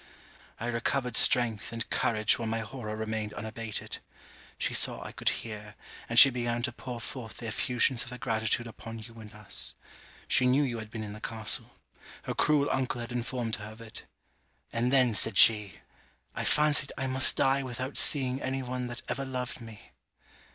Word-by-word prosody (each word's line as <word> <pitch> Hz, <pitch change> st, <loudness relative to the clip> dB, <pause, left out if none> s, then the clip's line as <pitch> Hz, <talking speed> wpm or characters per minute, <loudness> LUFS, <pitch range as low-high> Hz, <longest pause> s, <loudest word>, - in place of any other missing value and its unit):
I 115 Hz, -, -4 dB
recovered 120 Hz, +1 st, -1 dB
strength 115 Hz, -4 st, +3 dB
and 115 Hz, 0 st, -4 dB
courage 110 Hz, -1 st, +2 dB
while 115 Hz, -, -3 dB
my 115 Hz, +1 st, -1 dB
horror 110 Hz, -1 st, -6 dB
remained 110 Hz, -1 st, -3 dB
unabated. 110 Hz, +1 st, -6 dB, 0.6 s
She -, -, -1 dB
saw -, -, +3 dB
I -, -, -7 dB
could -, -, 0 dB
hear, 105 Hz, -2 st, -6 dB, 0.3 s
and 115 Hz, -, -2 dB
she 135 Hz, +2 st, +10 dB
began 120 Hz, -1 st, -2 dB
to 120 Hz, -, -1 dB
pour 120 Hz, 0 st, -7 dB
forth 115 Hz, -1 st, -8 dB
the 120 Hz, -, -8 dB
effusions 125 Hz, +3 st, +1 dB
of 120 Hz, -, -9 dB
her 125 Hz, -, -7 dB
gratitude 115 Hz, -1 st, 0 dB
upon 115 Hz, 0 st, -9 dB
you 115 Hz, +1 st, -11 dB
and 110 Hz, -1 st, -11 dB
us. 105 Hz, -2 st, +1 dB, 0.5 s
She 130 Hz, -, +4 dB
knew 135 Hz, +3 st, +4 dB
you 120 Hz, -4 st, -2 dB
had 110 Hz, -1 st, -8 dB
been 110 Hz, 0 st, -6 dB
in 105 Hz, -1 st, -6 dB
the 105 Hz, -, -10 dB
castle. 110 Hz, -2 st, -4 dB, 0.5 s
Her -, -, -3 dB
cruel 145 Hz, -2 st, +2 dB
uncle 130 Hz, -2 st, -1 dB
had 120 Hz, +1 st, -6 dB
informed 120 Hz, -1 st, -2 dB
her 105 Hz, 0 st, -8 dB
of 110 Hz, -, -16 dB
it. 115 Hz, -1 st, -11 dB, 0.7 s
'And 120 Hz, +2 st, +1 dB
then,' 130 Hz, -4 st, +4 dB
said 110 Hz, +2 st, +3 dB
she, 105 Hz, -3 st, +5 dB, 0.5 s
'I -, -, -3 dB
fancied 150 Hz, -2 st, +4 dB
I 135 Hz, -, -2 dB
must 130 Hz, 0 st, +3 dB
die 135 Hz, +1 st, +3 dB
without 130 Hz, +1 st, -5 dB
seeing 130 Hz, -2 st, +2 dB
any 130 Hz, 0 st, -2 dB
one 125 Hz, 0 st, -4 dB
that 120 Hz, 0 st, -7 dB
ever 135 Hz, -, -2 dB
loved 125 Hz, -2 st, -4 dB
me.' 115 Hz, -2 st, -12 dB
120 Hz, 185 wpm, -29 LUFS, 110-130 Hz, 0.7 s, she